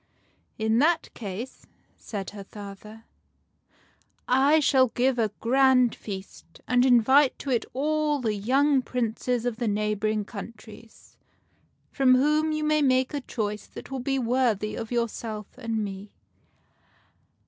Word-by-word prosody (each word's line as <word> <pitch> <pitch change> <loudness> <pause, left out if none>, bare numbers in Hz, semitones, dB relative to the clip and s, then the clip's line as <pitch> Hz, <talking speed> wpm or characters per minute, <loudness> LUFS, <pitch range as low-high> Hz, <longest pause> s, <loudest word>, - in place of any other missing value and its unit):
" - - -43
In 220 +1 +3
that 325 +4 +1
case," 215 +4 -7 0.3
said 200 -3 -6
her 200 -1 -9
father, 210 +2 -11 0.7
" - - -37 0.2
I 315 - +6
shall 265 -3 +4
give 250 +1 0
a 220 -2 +2
grand 255 0 +4
feast, 190 -4 -9
and 245 0 +3
invite 260 +3 +4
to 275 - -5
it 240 - +1
all 300 +2 0
the 225 -4 -1
young 265 +7 +2
Princes 245 0 -2
of 240 -2 -2
the 240 -1 -2
neighboring 210 0 -1
countries, 220 +1 -12 0.7
from 260 -2 +4
whom 300 +4 +2
you 310 0 -2
may 305 0 +2
make 260 0 +2
a 290 - -2
choice 210 -4 -4
that - - -11
will 265 - -3
be 270 +2 -1
worthy 235 -4 0
of 225 - -6
yourself 225 -3 -3
and 230 -4 -3
me." 195 +1 -8
240 Hz, 140 wpm, -26 LUFS, 215-265 Hz, 0.7 s, I